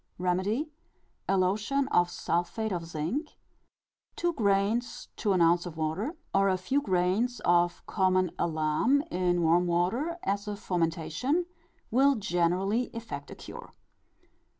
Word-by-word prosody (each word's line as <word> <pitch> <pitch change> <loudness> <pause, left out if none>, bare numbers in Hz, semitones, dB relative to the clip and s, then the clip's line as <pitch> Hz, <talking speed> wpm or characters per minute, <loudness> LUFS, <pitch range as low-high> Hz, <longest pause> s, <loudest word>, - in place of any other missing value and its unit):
Remedy: 190 - -1 0.6
A 195 - +3
lotion 210 +9 +1
of 175 0 +3
sulphate 175 +6 -2
of 170 -3 -3
zinc, 170 - -3 0.8
two 345 0 0
grains 210 0 0
to 210 - 0
an 185 - +2
ounce 170 +2 +3
of 165 -2 -9
water, 160 - -2 0.2
or 195 0 +4
a 185 - +2
few 270 +10 0
grains 195 +4 +1
of 175 0 +2
common 185 -2 +1
alum 160 - +1
in 175 -1 +1
warm 170 +2 +3
water, 225 - 0
as 200 +1 -1
a 210 - -3
fomentation, 175 - -1 0.5
will 270 +4 +4
generally 195 +3 +1
effect 230 0 -6
a - - -8
cure. - - -11
190 Hz, 130 wpm, -29 LUFS, 175-230 Hz, 0.8 s, or